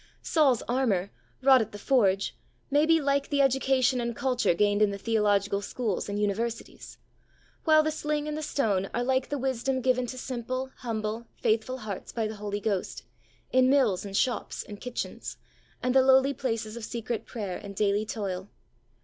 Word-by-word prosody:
Saul's 280 -8 +3
armour, 225 -7 0 0.3
wrought 265 -2 +7
at 220 -1 -4
the - - -6
forge, 200 -4 +2 0.4
may 295 +2 +4
be 325 0 +5
like 280 -1 0
the 285 - 0
education 265 -1 +3
and 235 -1 -3
culture 250 -8 +1
gained 205 +2 +2
in 210 - +5
the 200 - -4
theological 205 -2 +1
schools 210 -1 -3
and 205 0 -2
universities, 220 +3 -3 0.7
while 310 -1 +6
the 310 - 0
sling 300 -1 -2
and 300 - -3
the 310 - -3
stone 205 -11 0
are 240 - 0
like 260 +1 +1
the 290 - -1
wisdom 265 0 -1
given 255 -1 +1
to 255 - -6
simple, 255 +1 -4
humble, 225 -1 -3
faithful 225 +4 0
hearts 215 -6 -6
by 225 -2 -1
the 215 0 -7
Holy 205 0 -3
Ghost, 200 -3 -2 0.5
in 255 0 +4
mills 255 -10 +3
and 195 -1 -3
shops 250 - -1
and 205 -1 -10
kitchens, 250 -1 -5 0.5
and 250 0 +1
the 265 - +6
lowly 265 +1 +5
places 225 -5 -3
of 235 - -7
secret 230 0 -4
prayer 205 -6 -4
and 200 -1 -9
daily 205 +1 +2
toil. 200 -3 -4
235 Hz, 175 wpm, -28 LUFS, 205-265 Hz, 0.7 s, wrought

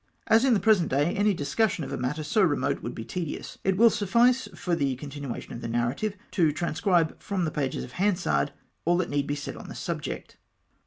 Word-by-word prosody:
As 225 +1 +5
in 260 -3 +5
the - - +2
present 205 -7 +3
day 145 +6 +2
any 205 +1 +3
discussion 190 +3 0
of - - -6
a - - -1
matter 135 +5 -2
so 215 +8 +2
remote 145 -5 +1
Avould - - -5
be 115 - -6
tedious, 165 +6 -5
it 190 -1 +1
will 230 +2 +7
suffice 235 +5 +3
for 175 +1 -1
the 140 -5 0
continuation 140 -2 -6
of 120 - -7
the - - -4
narrative 120 - -1
to 165 -5 +3
transcribe 170 +1 0
from 190 -4 -1
the 155 - -2
pages 135 -3 -2
of 125 - -9
Hansard 175 - +1 0.3
all 175 +1 +3
that 180 -4 -1
need 145 0 0
be 145 - -1
said 145 - -6
on - - -10
the - - -8
subject. - - -5
165 Hz, 215 wpm, -27 LUFS, 140-205 Hz, 0.3 s, will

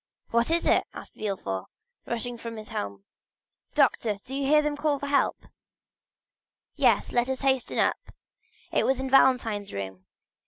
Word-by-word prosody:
"What 235 +3 +2
is 335 +1 +1
it?" - - +4
asked - - -9
Villefort, 145 - -3 0.4
rushing 240 +1 -3
from 230 -1 -7
his 215 -1 -9
room. 100 -1 -4 0.7
"Doctor, 215 -3 +2
do 260 - -8
you 275 0 -1
hear 300 +1 +5
them 300 0 -1
call 290 0 0
for 285 - -5
help?" 280 -1 +1 1.3
"Yes, - - +3
yes; - - -8
let 240 +1 +2
us 265 -1 -2
hasten 265 -2 +1
up; - - +2 0.7
it - - +2
was 265 -1 +1
in 265 0 -3
Valentine's 235 -7 +3
room." 95 -1 -6
245 Hz, 160 wpm, -27 LUFS, 205-270 Hz, 1.3 s, hear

